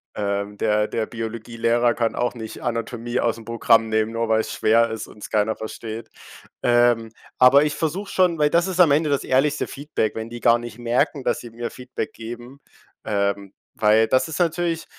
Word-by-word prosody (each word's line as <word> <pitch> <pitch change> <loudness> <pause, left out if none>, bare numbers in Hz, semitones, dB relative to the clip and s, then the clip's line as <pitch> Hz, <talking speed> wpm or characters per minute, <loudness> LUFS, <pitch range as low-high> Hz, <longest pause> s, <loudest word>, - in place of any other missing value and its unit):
Ähm, 100 0 -2
der 105 0 +1
der 110 -1 -2
Biologielehrer 115 +1 -1
kann 115 -1 -1
auch 120 0 0
nicht 110 -2 -8
Anatomie 120 +1 -3
ausm 115 -1 -1
Programm 115 -1 +3
nehmen, 110 0 +1
nur 115 0 -1
weil 110 0 +3
es - - -6
schwer 115 +2 +3
ist 110 0 -5
und - - -16
es - - -8
keiner 110 +1 +1
versteht. 110 +1 -7 0.5
Ähm, 120 -2 +3 0.3
aber 130 +3 +7
ich 150 -1 -1
versuche 175 +6 -3
schon 180 -3 +2
weil 150 0 +4
das 170 +2 +2
ist 185 -1 -4
am 175 -3 +7
Ende 150 +1 +2
das 140 - +1
ehrlichste 140 +3 +1
Feedback, 140 -7 -3
wenn 110 +1 -6
die 120 - -7
gar 120 0 +4
nicht 120 -1 -9
merken, 130 +4 0
dass - - 0
sie 120 - -10
mir 115 +1 -5
Feedback 125 -3 -6
geben, 120 +4 -9 0.5
ähm, 100 -1 -1 0.2
weil 110 +1 +4
das 130 +2 +2
ist 160 - -5
natürlich, 170 -1 0
115 Hz, 190 wpm, -22 LUFS, 110-135 Hz, 0.5 s, aber